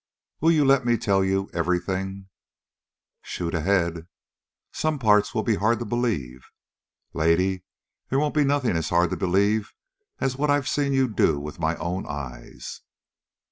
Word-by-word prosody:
"Will 160 - +3
you 155 -3 +3
let 135 -1 +4
me 120 -1 +2
tell 100 -3 +2
you 95 +1 0
everything?" 95 +3 -2 0.9
"Shoot 85 -2 -4
ahead." 85 -1 0 0.6
"Some 155 -1 -1
parts 105 -2 +3
will 110 - +1
be 110 -4 +1
hard 110 +3 +2
to 120 - -5
believe." 95 - -2 0.6
"Lady, 90 +4 +1 0.5
they 135 - +1
won't 150 +1 +1
be 150 - +3
nothing 140 -7 +1
as 80 -1 -1
hard 85 0 +2
to - - 0
believe 100 +4 +1 0.4
as 130 -1 -1
what 150 +1 0
I've 145 -1 +2
seen 145 -1 0
you 135 -1 +3
do 80 -9 +1
with 75 +3 -8
my 80 0 0
own 85 +4 -4
eyes." 65 -4 -7
95 Hz, 155 wpm, -25 LUFS, 85-125 Hz, 0.9 s, let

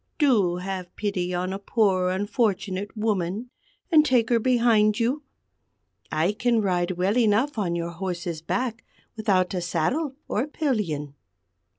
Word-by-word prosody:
Do 215 - +3
have 185 0 -5
pity 190 -4 -2
on 180 +1 -2
a 195 - -4
poor 195 -4 +2
unfortunate 205 0 -1
woman, 210 +2 -1 0.4
and 310 -2 +7
take 250 -6 +2
her 235 - +4
behind 230 -3 +3
you. 250 +6 0 0.9
I 160 +5 +2
can 235 +2 +1
ride 180 -3 0
well 190 +4 +1
enough 225 +4 +2
on 175 -4 0
your 170 0 -3
horse's 170 -2 -4
back 225 +6 -2 0.3
without 195 -5 +1
a 180 - -1
saddle 250 - -1
or 245 +7 -1
pillion." 205 - -2
205 Hz, 135 wpm, -25 LUFS, 180-235 Hz, 0.9 s, and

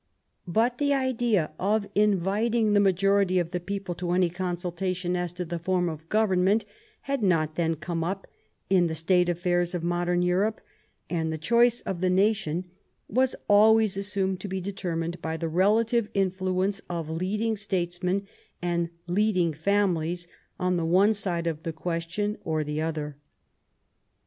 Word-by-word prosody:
But 230 +7 +1
the 285 -1 +2
idea 240 - +1
of 205 +2 +1
inviting 210 +3 +2
the 205 - +5
majority 195 -1 +3
of 175 -2 0
the 180 - -1
people 195 0 -4
to 175 0 -3
any 180 -1 +2
consultation 180 0 -2
as 175 -1 -2
to 180 0 -4
the 170 0 -4
form 180 +1 0
of 160 0 -8
government 205 -1 +2 0.4
had 275 -2 -2
not 165 -6 +2
then 165 0 0
come 165 +1 -3
up 190 +3 -3 0.4
in 185 -2 +3
the 160 - -3
state 175 +2 +2
affairs 175 0 0
of 170 - -3
modern 175 +1 +1
Europe, 190 +5 +1 0.5
and 160 -2 -1
the 160 - -3
choice 235 +7 +3
of 185 -3 -4
the 185 - +2
nation 185 -3 +1 0.4
was 260 +4 +1
always 215 0 +5
assumed 195 -1 -1
to 200 - -6
be 190 0 -3
determined 175 -3 -4
by 160 0 -3
the 165 - -2
relative 215 +6 +2
influence 190 +1 0
of 170 -3 -3
leading 200 +7 -1
states 180 -4 -2
men 190 +2 0 0.3
and 170 -1 -1 0.2
leading 180 -2 +1
families 175 -1 0 0.3
on 180 0 +1
the 170 - -1
one 190 +6 +4
side 180 -5 -2
of 160 -2 -2
the 165 0 -3
ques 165 +1 -3
tion 205 +4 -2
or 155 -1 -1
on - - -3
the 150 +1 -2
other. 150 -3 -3
180 Hz, 165 wpm, -27 LUFS, 170-205 Hz, 0.5 s, the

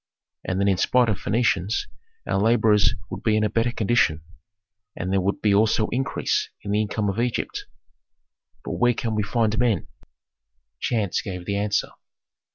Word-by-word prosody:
And 90 - -2
then 100 - +2
in 95 -2 +3
spite 125 +5 +3
of 105 - -1
Phœnicians 105 -2 0 0.4
our - - 0
laborers 110 -2 +3 0.2
would - - -5
be 110 -1 +2
in 110 - +1
a 105 - 0
better 115 +2 +1
condition, 105 - +1 0.7
and 95 +2 -3
there 95 - +2
would 100 +2 -2
be 105 -2 +4
also 110 +1 +3
increase 135 +3 -1
in 100 - -4
the 105 +1 +2
income 105 0 -2
of 100 +3 -2
Egypt. 120 0 -2 1.0
But - - -4
where 120 -1 +3
can 115 -1 -2
we 105 - 0
find 110 +1 0
men?" 115 -8 +1 0.9
Chance 105 -6 0
gave 90 -3 -6
the 100 +2 -1
answer. 105 0 0
105 Hz, 165 wpm, -24 LUFS, 100-115 Hz, 1.0 s, be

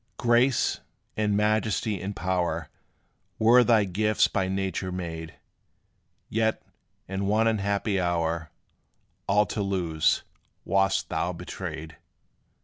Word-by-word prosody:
Grace, 120 +1 +2 0.4
and 105 -1 +1
majesty, 105 -1 0
and 100 +1 -4
power 90 0 -1 0.7
Were 120 +3 +6
thy 115 -3 +4
gifts 105 +3 +2
by 95 - -1
nature 95 -1 -2
made; 80 -3 -6 0.9
Yet, 110 0 0 0.4
in 95 +1 -2
one 110 +2 +3
unhappy 100 -1 0
hour, 85 -2 -1 0.8
All 105 +2 +4
to 105 +2 -3
lose, 90 -6 +1 0.4
wast 95 0 +1
thou - - -1
betrayed. 80 0 -7
100 Hz, 105 wpm, -26 LUFS, 90-110 Hz, 0.9 s, Were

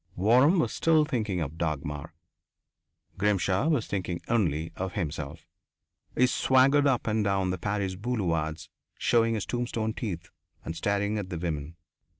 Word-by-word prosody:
Waram 125 - +5
was - - 0
still 160 -2 +3
thinking 110 - -1
of 80 +2 -5
Dagmar; 75 0 -3 1.0
Grimshaw 100 - +2
was 150 -9 +2
thinking 90 -3 -3
only 85 -9 0
of 95 -1 -4
himself. 75 -6 -4 0.7
He 125 - +6
swaggered 135 +3 +4
up 130 -3 +1
and 110 -1 +1
down 95 -2 +1
the 90 - -3
Paris 100 0 -1
boulevards 90 -8 -2 0.3
showing 115 -1 +2
his 105 -6 -2
tombstone 115 0 -2
teeth 90 -9 -5 0.3
and 80 - -4
staring 100 +4 0
at 95 -2 -5
the 90 - -4
women. 80 -2 -4
100 Hz, 145 wpm, -28 LUFS, 85-115 Hz, 1.0 s, He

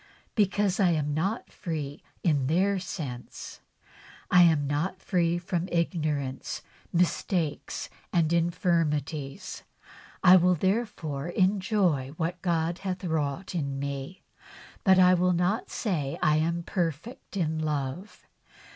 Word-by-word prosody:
Because 205 -2 +1
I 190 -3 +5
am 150 -2 0
not 195 +10 -2
free 150 -6 -5 0.2
in 145 -6 +2
their 190 +5 +2
sense, 140 -9 -7 0.7
I 180 - +7
am 160 -4 +5
not 155 +7 -1
free 175 -3 +1
from 175 0 -2
ignorance, 155 -6 -1 0.3
mistakes 170 -2 0 0.2
and 165 -2 +2
infirmities. 165 -4 0 0.6
I 180 +1 +9
will 180 0 +4
therefore 180 -6 -1
enjoy 185 - +1
what 170 +1 -2
God 170 -1 0
hath 190 -1 -4
wrought 160 +1 -2
in 140 -5 -2
me, 140 +5 -5 0.6
but 190 -1 +6
I 185 0 +7
will 180 0 +3
not 180 +6 0
say 155 - -2
I 155 0 +3
am 170 +2 0
perfect 175 - -3
in 160 -3 0
love. 155 +5 -3
170 Hz, 120 wpm, -28 LUFS, 150-185 Hz, 0.7 s, I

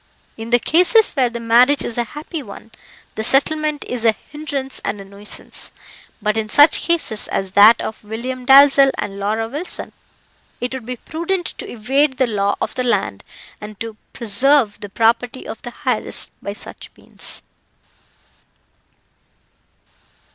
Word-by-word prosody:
In 225 +1 -8
the 240 - +5
cases 360 - +4
where 260 -5 +1
the 235 0 -6
marriage 240 +5 +4
is 230 - -5
a 240 - 0
happy 310 +1 -6
one, 220 -1 -12 0.4
the 220 - -4
settlement 300 +4 +1
is 245 -2 -4
a 225 -1 +4 0.2
hindrance 285 -3 -4
and 205 - -3
a 195 - -9
nuisance; 200 +1 -3 0.5
but 210 0 +1
in 215 -1 -2
such 290 +7 +6
cases 320 -11 0
as 195 -1 -3
that 205 +4 +7
of 220 - -6
William 245 +4 -5
Dalzell 275 +1 +7
and 200 -1 -5
Laura 215 +3 -1
Wilson, 295 +9 -6 0.7
it 245 +1 -3
would 255 -3 -7
be 250 - -3
prudent 340 +7 -3
to - - -6
evade 265 +4 0
the 260 - +3
law 200 -3 0
of - - -3
the 255 - -2
land, 245 - -1 0.4
and 210 -1 -9
to 225 -1 -6 0.2
preserve 235 +1 +1
the 205 - -8
property 235 +4 0
of - - -7
the 240 - -8
heiress - - 0
by 200 - -5
such - - -8
means. - - -7
240 Hz, 155 wpm, -19 LUFS, 220-280 Hz, 0.7 s, that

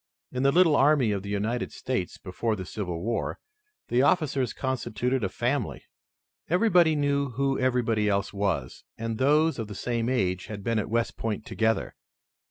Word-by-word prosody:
In 125 - -2
the 135 +1 +4
little 165 -1 +5
army 140 -5 +4
of 100 -2 -1
the 100 - -7
United 105 +4 -1
States 125 -9 -3
before 105 +4 -2
the 95 -2 -6
Civil 90 -4 -4
War, 115 +1 -2 0.5
the 120 - +3
officers 140 -5 +2
constituted 125 -1 -2
a 95 - 0
family. 125 +8 -2 0.7
Everybody 175 -3 +4
knew 140 -1 +1
who 135 +2 0
everybody 115 -5 +1
else 100 0 0
was, 95 -11 -2
and 115 -1 -3
those 150 +2 +3
of 110 - -3
the 105 - -8
same 120 +2 -1
age 95 -8 0
had 105 -2 -7
been 115 0 +1
at 105 - -3
West 115 +1 -1
Point 110 -1 -3
together. 110 0 0
120 Hz, 170 wpm, -27 LUFS, 105-140 Hz, 0.7 s, little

